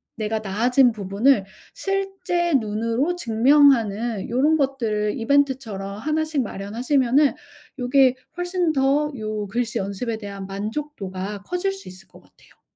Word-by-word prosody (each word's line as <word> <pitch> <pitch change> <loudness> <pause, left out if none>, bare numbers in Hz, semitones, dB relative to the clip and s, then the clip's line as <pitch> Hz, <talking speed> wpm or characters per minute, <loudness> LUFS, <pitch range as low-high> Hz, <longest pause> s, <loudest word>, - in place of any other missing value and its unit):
내가 220 0 -2
나아진 240 +6 +3
부분을 205 +2 +2 0.3
실제 390 -3 -1
눈으로 230 +9 -1
증명하는 235 - +3
요런 280 +7 +3
것들을 225 -7 0
이벤트처럼 230 -7 0
1 310 +4 0
씩 310 -3 -1
마련하시면은 245 +7 +1 0.5
요게 255 +1 +4 0.2
훨씬 355 -1 0
더 280 +2 +2
요 215 -2 -4
글씨 230 +2 -2
연습에 200 +4 -3
대한 200 -2 -7
만족도가 200 -2 -5
커질 360 - -1
수 390 - -11
있을 185 +1 -12
것 - - -18
같아요. - - -25
240 Hz, 280 characters per minute, -23 LUFS, 210-290 Hz, 0.5 s, 요게